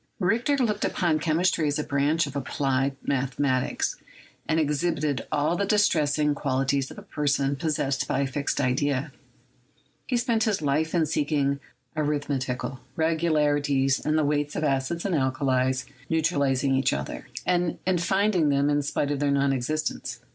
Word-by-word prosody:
Richter 230 +9 +2
looked 215 -6 0
upon 165 -3 +1
chemistry 160 0 +1
as 145 - 0
a 150 - -1
branch 145 +4 +1
of 140 -1 -8
applied 135 0 0
mathematics, 130 -1 0 0.5
and 160 0 +2
exhibited 150 -1 0
all 150 +3 +1
the 200 - 0
distressing 155 -8 +2
qualities 135 0 0
of - - -11
a - - -9
person 140 -1 0
possessed 140 -2 -1
by 135 - 0
a - - +1
fixed 140 +2 -2
idea; 140 +2 0 1.0
he 250 - +1
spent 235 -2 +1
his 215 -3 +1
life 155 +3 0
in 165 -2 +3
seeking 145 -2 0 0.4
arithmetical 140 -4 -2 0.2
regularities 145 -4 +1
in 155 +1 +1
the 155 -1 +2
weights 145 0 0
of - - -2
acids 140 +5 -1
and 195 - 0
alkalies 130 -2 +1 0.2
neutralizing 140 -5 +1
each 135 0 +2
other, 70 0 -5 0.2
and 175 -1 +1
in 185 -1 +2
finding 190 -2 +2
them 140 +1 +2
in 145 0 +2
spite 145 0 -1
of 145 - -1
their 145 0 +1
non 140 0 +2
existence. 155 +4 -3
145 Hz, 155 wpm, -26 LUFS, 140-160 Hz, 1.0 s, in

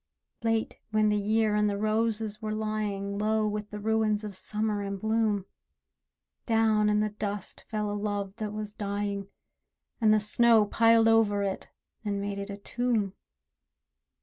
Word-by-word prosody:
Late, 225 -1 0
when 215 -1 +3
the 210 - +2
year 215 +1 +2
and 210 0 +3
the 200 - -2
roses 215 0 0
were 215 -1 -2
lying 210 -2 -2
Low 215 0 +1
with 210 0 -3
the 210 - -6
ruins 215 0 +1
of 205 -2 -6
Summer 210 +1 -2
and 200 -1 -4
bloom, 220 -2 +1 1.0
Down 220 -2 +3
in 210 0 +3
the 215 0 0
dust 205 -2 -5
fell 210 -2 -2
a - - -2
love 205 -1 -3
that 215 -1 -3
was 210 -1 -5
dying, 200 -1 -3 0.7
And 215 -1 +5
the 215 - +5
snow 220 +1 +4
piled 225 +1 +4
over 215 -3 +4
it, 195 -1 -3 0.3
and 205 -2 -1
made 200 0 -3
it 200 +1 -5
a 200 - -5
tomb. 220 -2 -1
210 Hz, 160 wpm, -28 LUFS, 205-220 Hz, 1.0 s, And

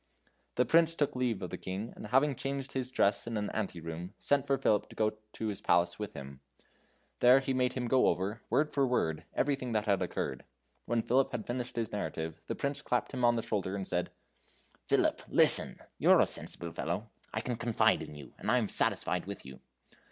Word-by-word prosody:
The 125 - +3
Prince 165 0 +4
took 145 -4 0
leave 120 -6 -1
of 90 - -5
the - - -5
King, 95 +5 -5
and - - -8
having 135 +5 +3
changed 135 +1 -4
his 130 -1 -3
dress 100 -3 +1
in 115 -1 -2
an 105 0 -2
ante 100 -5 -3
room, 85 +4 -7
sent 145 -1 +1
for 135 - +2
Philip 105 -5 +1
to - - -13
go 110 -1 +1 0.2
to 110 - -5
his 100 - -5
palace 85 +1 +2
with 105 - -5
him; 70 -1 -9 0.8
there 125 +2 +7
he 135 0 -2
made 125 -1 +1
him 125 -2 -3
go 130 +2 +3
over 100 +5 -1
word 150 +1 +2
for 140 -2 +2
word 80 -11 -1
everything 135 -4 0
that 105 -1 0
had 100 -3 +1
occurred. - - -3 0.4
When 120 -1 0
Philip 130 +3 +2
had 120 -4 -4
finished 125 0 -4
his 115 -2 -2
narrative, 80 -5 -4
the - - -3
Prince 140 +1 -2
clapped 125 -4 -1
him 125 -2 -3
on 120 0 +5
the 115 - -2
shoulder 100 -2 -2
and 95 -2 -4
said: 90 -1 -1 0.8
"Philip, - - +2
listen! - - +6 0.2
You're - - +6
a - - +5
sensible 85 -1 -1
fellow. 95 +8 -4 0.2
I 110 - -2
can 125 0 -3
confide 115 -1 +2
in 75 - -8
you, 70 -2 -11
and - - -4
I - - +4
am - - 0
satisfied - - +2
with - - -7
you. 65 0 -11
115 Hz, 210 wpm, -31 LUFS, 95-130 Hz, 0.8 s, there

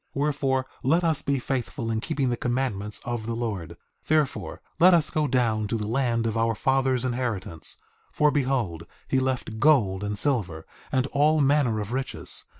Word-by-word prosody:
3:16 140 - -1
Wherefore, 135 -3 0 0.2
let 165 +7 +2
us 160 -3 +1
be 140 -1 0
faithful 125 -2 -3
in 110 -1 -1
keeping 140 -2 -1
the - - +1
commandments 120 -5 -1
of 120 -2 -3
the 115 - -2
Lord; 105 -8 -4 0.3
therefore 155 -3 0 0.2
let 180 +1 +7
us 155 -3 +1
go 155 -1 +1
down 115 -5 +1
to 115 - -1
the 105 - -3
land 115 0 0
of 115 -1 -1
our 115 0 +1
father's 130 +1 +1
inheritance, 115 -10 -2 0.3
for 150 0 +3
behold 125 - -1 0.2
he 130 - +2
left 130 -4 -2
gold 110 -9 +3
and 105 0 -2
silver, 100 - 0 0.3
and 130 -1 +1
all 150 +2 +3
manner 140 -6 +3
of 105 +1 -5
riches. 130 +1 -2
125 Hz, 175 wpm, -26 LUFS, 110-140 Hz, 0.3 s, let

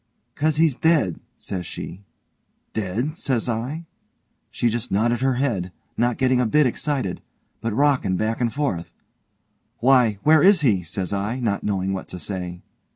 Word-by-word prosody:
''Cause 155 0 +1
he's 155 -5 +3
dead', 155 - +2 0.2
says 90 -2 -4
she. 90 +3 -7 0.7
'Dead?' 110 - -2
says 130 -8 -1
I. 125 +8 -3 0.6
She 120 - 0
just 115 0 -2
nodded 120 +4 +1
her 135 -1 +2
head, 110 -9 -1 0.2
not 120 0 +1
getting 130 -1 +3
a 125 - +2
bit 150 +6 +4
excited, 130 -5 -1 0.4
but 115 0 -1
rockin' 125 -6 +2
back 110 +4 -1
and 120 -2 +1
forth. 135 - -2 0.9
'Why 125 -4 +4
where 155 0 +6
is 195 -2 +6
he?' 110 -10 +3
says 90 +2 -4
I, 105 +6 -2
not 110 -5 -1
knowing 95 -2 -1
what 95 - -5
to - - -7
say. 90 -1 -5
120 Hz, 160 wpm, -23 LUFS, 100-140 Hz, 0.9 s, where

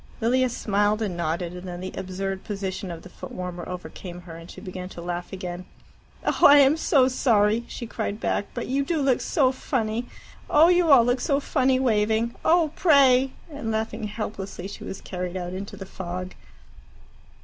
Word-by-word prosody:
Lilia 255 +3 +2
smiled 210 -1 +1
and 195 -5 -2
nodded, 170 +1 -2
and 180 +1 -8
then 175 -1 -6
the 185 +1 -6
absurd 190 +1 -4
position 195 -1 -4
of 165 -1 -7
the - - -11
foot - - -10
warmer 180 -1 -6
overcame 180 0 -7
her, 170 -2 -10
and 165 +1 -11
she - - -10
began 185 0 -7
to 175 - -10
laugh 175 0 -4
again. 185 -2 -5 0.6
"Oh, - - +5
I 285 0 +8
am 280 +1 +6
so 275 -5 +3
sorry," 230 -3 +2
she 235 - -6
cried 215 -2 -4
back, 205 - -1
"but 240 - -3
you 275 +2 0
do 320 +3 -1
look 270 -3 +2
so 265 -5 +2
funny. 240 -3 -2 0.4
Oh, 315 +3 +6
you 355 -2 +4
all 255 -4 +8
look 245 +1 +1
so 280 +1 +1
funny 260 -2 +2
waving! 225 -1 +1
Oh, 330 -2 +4
pray!" 270 -5 +5 0.2
And 285 -6 -5
laughing 220 0 -2
helplessly, 200 -3 -5
she 200 - -9
was 195 - -7
carried 180 0 -4
out 180 0 -4
into 195 +2 -6
the 195 - -7
fog. 185 0 -6
210 Hz, 185 wpm, -25 LUFS, 185-255 Hz, 0.6 s, I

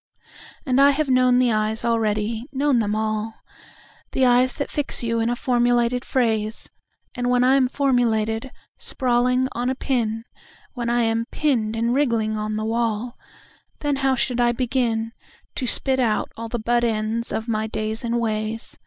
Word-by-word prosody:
And 265 -1 +3
I 280 - +7
have 285 -1 0
known 255 -1 +4
the 250 -1 +3
eyes 215 +1 -1
already, 220 -1 0
known 275 -2 +2
them 210 -1 0
all—The 220 +4 -4
eyes 250 +1 +4
that 285 - -4
fix 290 -4 -2
you 230 0 0
in 225 +1 +1
a 240 - 0
formulated 245 0 +1
phrase, 220 -4 -1 0.4
And 245 0 -2
when 250 0 +3
I 255 +1 +4
am 270 -2 +4
formulated, 240 -4 0 0.3
sprawling 250 0 +1
on 245 +2 -2
a 260 - -1
pin, 230 -5 -1 0.5
When 240 -2 -3
I 240 0 +2
am 230 0 0
pinned 230 -8 0
and 230 +1 0
wriggling 230 -6 +1
on 215 0 -3
the 215 0 -2
wall, 230 +1 -1 0.7
Then 290 -2 0
how 270 -1 +2
should 245 0 0
I 240 0 +3
beginTo 235 -2 -1 0.6
spit 265 +2 +1
out 225 -4 0
all 230 0 -6
the 240 - -2
butt 240 +2 +1
ends 225 0 -1
of 220 - -3
my 220 -1 -1
days 220 +1 -3
and 235 0 0
ways? 220 0 -3
235 Hz, 165 wpm, -22 LUFS, 220-255 Hz, 0.7 s, I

